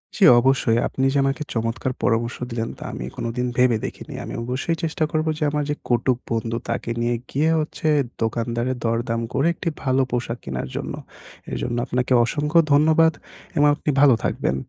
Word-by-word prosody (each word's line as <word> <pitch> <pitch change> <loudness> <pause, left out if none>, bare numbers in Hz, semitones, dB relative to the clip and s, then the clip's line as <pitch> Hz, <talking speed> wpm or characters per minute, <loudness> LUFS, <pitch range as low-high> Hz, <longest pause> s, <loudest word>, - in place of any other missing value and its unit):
জি, - - +1 0.2
অবশ্যই 125 -2 +2
আপনি 135 - -1
যে - - +2
আমাকে 135 +2 0
চমৎকার 115 +2 -1
পরামর্শ 115 0 +1
দিলেন, 115 -1 -3
তা - - -9
আমি 60 - -5
কোনদিন 120 +2 -2
ভেবে 125 -2 +4
দেখিনি। - - -7
আমি - - -7
অবশ্যই 130 +7 -1
চেষ্টা 160 -1 -1
করব 155 0 0
যে 155 - -2
আমার 150 0 0
যে 150 - 0
কটুক 120 +1 +2
বন্ধু 115 0 -1
তাকে - - -2
নিয়ে 120 0 +1
গিয়ে 155 +4 +1 0.7
দোকানদারের 120 +2 -1
দরদাম 115 0 0
করে 140 +5 +2
একটি 170 - -3
ভালো 130 0 +2
পোশাক 120 -1 -2
কেনার 65 -1 -4
জন্য। - - -4 0.6
এর - - -2
জন্য 120 -1 -2
আপনাকে 125 +1 0
অসংখ্য 150 +5 +2
ধন্যবাদ 160 +2 +5 0.4
এবং 145 0 +5
আপনি 150 - -4
ভালো 145 -3 +7
থাকবেন। 65 - 0
125 Hz, 170 wpm, -22 LUFS, 115-145 Hz, 0.7 s, ভালো